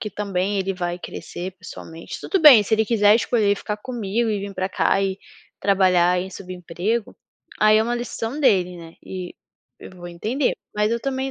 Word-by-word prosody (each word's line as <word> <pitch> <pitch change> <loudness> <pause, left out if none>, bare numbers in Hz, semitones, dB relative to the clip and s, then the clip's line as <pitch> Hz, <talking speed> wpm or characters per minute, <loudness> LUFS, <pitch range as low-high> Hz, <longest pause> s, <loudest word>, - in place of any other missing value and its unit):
que 220 - -3
também 200 -1 -2
ele 195 0 -1
vai 175 -1 -3
crescer 180 +1 -7
pessoalmente. 165 -2 -9
Tudo 385 - -1
bem, 280 -9 +9
se 205 - -7
ele 220 0 +1
quiser 210 -2 +4
escolher 220 -3 +1
ficar 210 +1 -4
comigo, 225 -1 -2
e 205 - -1
vim 200 0 -6
pra 185 0 -1
cá, 195 - +1
e 195 0 -2 0.4
trabalhar 185 -2 +3
em 190 +1 -6
subemprego, 185 +4 -4 0.5
aí 215 0 +6
é - - +3
uma 240 +2 -1
decisão 240 +3 -4
dele, 180 -8 +2
né, 165 -1 -12
e 185 -2 -7 0.4
eu - - -11
vou 175 -1 -10
entender. 225 +11 -1 0.2
Mas 210 +1 +1
eu 235 - 0
também, 265 +1 -2
200 Hz, 185 wpm, -22 LUFS, 180-225 Hz, 0.5 s, bem